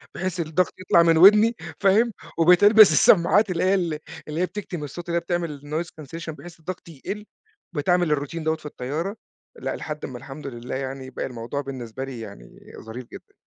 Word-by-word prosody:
بحيث 185 -1 -3
الضغط 165 +3 0
يطلَع 170 -2 +4
من 165 -1 +4
ودَني 210 +6 +7 0.2
فاهم؟ 210 +3 +3 0.2
وبقت 175 +3 +5
ألبس 210 -4 +8
السماعات 190 +6 +5
اللي 170 - -1
هي 190 +1 +3
ال 165 -5 -1 0.3
اللي 155 +3 -3
هي - - +3
بتكتم 180 -6 -6
الصوت، 170 +5 -7
اللي 170 - -1
هي - - 0
بتعمل 170 -4 -3
noise 155 +4 -3
cancellation، 160 +2 -8
بحيث 170 -1 -12
الضغط 170 +1 -7
يقلّ، 200 +8 -7 0.5
بقيت 145 +3 -2
أعمل 175 -4 +3
الroutine 145 +4 -5
دوّة 160 0 +1
في 155 - -17
الطيارة 150 - -4 0.4
لأ - - -4
لحد 150 -1 -6
ما، 125 -2 -7
الحمد 140 +3 -9
لله 120 0 -6
يعني، 130 0 -5
بقى - - -4
الموضوع 125 +3 -4
بالنسبة 130 -2 -6
لي 130 -3 -7
يعني - - -11 0.2
ظريف 115 +3 -8
جدًا. - - -12
165 Hz, 190 wpm, -24 LUFS, 140-180 Hz, 0.5 s, ألبس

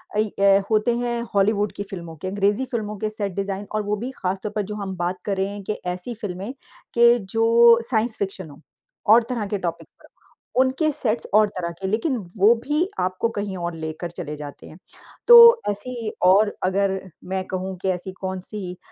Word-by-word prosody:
अ, - - +1
ये 200 -2 +3
होते 220 +2 +2
हैं 240 -1 -2
हॉलीवुड 205 +1 +2
की 200 - -4
फ़िल्मों 175 -5 -8
के 170 - -7
अँग्रेज़ी 205 +6 +1
फ़िल्मों 210 -3 -3
के 215 +2 -2
सेट 205 -3 -4
डिज़ाइन 200 0 -3
और 215 0 -1
वो 205 +1 -1
भी 260 - -4
ख़ासतौर 190 +3 -2
पर 210 - +1
जो - - -4
हम 195 -2 -5
बात 175 +1 -2
कर 200 -2 -1
रहे 190 - 0
हैं 200 0 -7
कि 215 - -2
ऐसी 180 +7 -4
फ़िल्में 200 +4 -5 0.4
के 235 0 +6
जो 230 +3 +5
साइंस 225 -1 0
फ़िक्शन 190 -4 -4
हो 145 +1 -15 0.5
और 235 +1 +6
तरह 235 -4 -2
के 205 - -2
टॉपिक 170 -3 -4
पर। - - -18 0.5
उनके 265 +4 +1
सेट्स 235 -6 -2
और 215 0 +6
तरह 170 -1 -2
के। 190 - -2
लेकिन 225 +8 0 0.2
वो 205 +4 +6
भी 300 +6 +1
आपको 185 +5 0
कहीं 205 -3 -4
और 175 -1 -4
लेकर 160 +2 -5
चले 160 -4 -6
जाते 145 -1 -9
हैं। 155 - -13 0.5
तो 480 - +10 0.3
ऐसी 230 +2 -3 0.2
और 205 +3 +5
अगर 190 +1 +1 0.3
मैं 190 0 -1
कहूँ 190 0 -4
कि 190 - 0
ऐसी 185 +1 -3
कौन-सी 190 0 -5
200 Hz, 195 wpm, -23 LUFS, 185-225 Hz, 0.5 s, तो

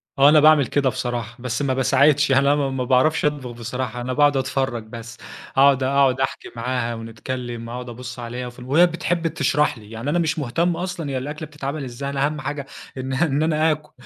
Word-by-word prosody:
آه، 140 +1 +6
أنا 150 0 +7
باعمل 150 -3 +6
كده 140 0 +1
بصراحة، 120 -2 -4
بس 125 +1 -3
ما 140 -2 +1
باساعدش. 140 +2 +3
أنا 140 +2 +4
ما 140 -2 0
ما 135 -1 -2
باعرَفش 130 +6 +2
أطبخ 145 -4 -1
بصراحة، 120 +1 -5
أنا 130 +1 -3
باقعد 145 0 +4
أتفرَّج 130 -2 -1
بس، 115 +1 -10 0.4
أقعد 135 -1 +5
أقعد 135 -1 +3
أحكي 135 - -3
معاها 120 0 -2
ونتكلَّم، 115 +1 -6
أقعد 125 +1 -6
أبُص 125 +1 -8
عليها، 120 +1 -5
وفي 120 +1 -11
ال 125 - -9
وهي 150 +7 +5
بتحب 170 0 -1
تشرَح 150 -2 +1
لي. 105 -1 -14
يعني 115 +5 -4
أنا 175 - +1
مش 160 -1 0
مهتم 165 +6 0
أصلًا، 180 -4 -4
هي 135 - -2
الأكلة 150 +4 -5
بتتعمل 145 0 -5
إزاي، 130 +2 -5
أنا 140 0 0
أهَم 150 0 -3
حاجة 140 0 -4 0.3
إن 130 0 -4
إن 145 +1 +1
أنا 160 0 +2
آكُل. 150 0 -5
135 Hz, 205 wpm, -22 LUFS, 125-150 Hz, 0.4 s, أنا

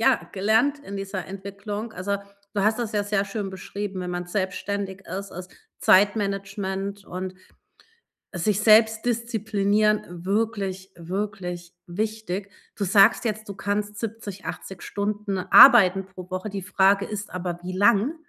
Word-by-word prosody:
ja, 265 +2 +2
gelernt 225 +9 +2
in 200 -8 -8
dieser 195 -3 -5
Entwicklung. 200 +4 -6
Also, 200 +3 -2 0.4
du 200 - +1
hast 220 +3 +2
das 230 -3 -3
ja 205 - +1
sehr 205 -1 0
schön 200 -1 -4
beschrieben, 190 0 -5
wenn 180 0 -4
man 175 0 -4
selbstständig 195 +1 -3
ist, 195 +3 -6
ist 180 +1 -8 0.3
Zeitmanagement 200 0 +1
und 185 +1 -6 1.0
sich 200 +3 0
selbst 220 +1 +5
disziplinieren 215 -3 +1 0.2
wirklich, 195 -2 -2
wirklich 180 -1 -5
wichtig. 205 0 -3 0.3
Du 200 - -1
sagst 195 +5 +5
jetzt, 215 -1 -3
du 200 - -6
kannst 205 +1 -2
70, 215 -4 -6
80 190 -2 -7
Stunden 205 -1 -2
arbeiten 195 -2 +7
pro 185 -1 -11
Woche. 185 +3 -4
Die 195 -1 -5
Frage 195 +2 +3
ist 205 -2 -6
aber, 175 -1 -4
wie 185 +1 -5
lang? 210 - +3
200 Hz, 140 wpm, -25 LUFS, 190-215 Hz, 1.0 s, arbeiten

